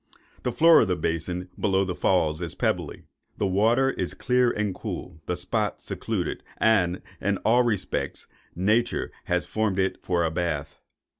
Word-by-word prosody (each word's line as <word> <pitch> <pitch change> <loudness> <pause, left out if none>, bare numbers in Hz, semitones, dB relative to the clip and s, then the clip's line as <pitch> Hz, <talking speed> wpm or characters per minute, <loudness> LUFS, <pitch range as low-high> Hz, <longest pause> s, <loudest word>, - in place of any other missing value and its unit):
The 125 - -1
floor 165 +6 +7
of 110 - +2
the 90 - +1
basin 90 +2 -2
below 95 -1 +2
the 90 - -2
Falls 80 -3 +1
is 85 -2 -4
pebbly, - - -1 0.3
the - - 0
water 115 +8 +3
is - - -4
clear 125 -1 +2
and 105 -4 -1
cool, 85 -2 -7
the 90 - 0
spot 105 +4 -1
secluded, - - -3 0.2
and, 95 -5 +2 0.2
in 100 +1 +1
all 120 +3 +5
respects, 115 -6 -2 0.3
Nature 110 +7 +1
has - - 0
formed 110 -3 -1
it 95 0 0
for 85 -2 0
a 80 - 0
bath. 80 -4 -3
95 Hz, 160 wpm, -26 LUFS, 90-110 Hz, 0.3 s, floor